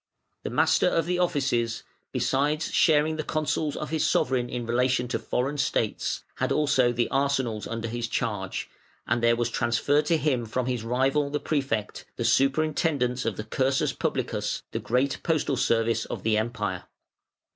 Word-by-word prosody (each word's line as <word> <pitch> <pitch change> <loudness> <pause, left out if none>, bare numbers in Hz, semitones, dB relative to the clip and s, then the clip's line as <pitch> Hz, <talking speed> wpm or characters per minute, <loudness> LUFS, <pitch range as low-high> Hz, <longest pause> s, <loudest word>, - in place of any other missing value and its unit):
The - - -4
Master 155 +9 +3
of 165 -3 +1
the 180 +1 -1
Offices, 135 -10 0 0.3
besides 150 +4 0
sharing 155 -1 +3
the 155 - -2
counsels 155 -1 -1
of 155 - -5
his 160 -2 +1
sovereign 125 -1 +1
in 120 -1 -4
relation 125 +1 +1
to - - -1
foreign 140 +4 -2
states, 115 -6 -1
had - - -1
also 135 -5 +3
the 120 0 0
arsenals 135 -6 0
under 115 0 -4
his 120 +1 -3
charge, 105 -6 -2 0.4
and 120 +1 0
there 115 0 +4
was 120 0 -1
transferred 140 +6 +1
to 165 - +3
him 130 -7 0
from 125 +3 -1
his 125 -3 -2
rival, 135 +5 +1
the 150 +1 -1
Prefect, 135 -10 -2
the 120 - -3
superintendence 135 -1 +1
of 115 -4 -1
the 110 - -3
cursus 130 +5 0
publicus, - - -2
the - - -2
great 130 +4 0
postal 155 -4 0
service 115 -2 +1
of - - -6
the 110 -1 +2
Empire. 105 -5 -2
125 Hz, 165 wpm, -26 LUFS, 115-150 Hz, 0.4 s, there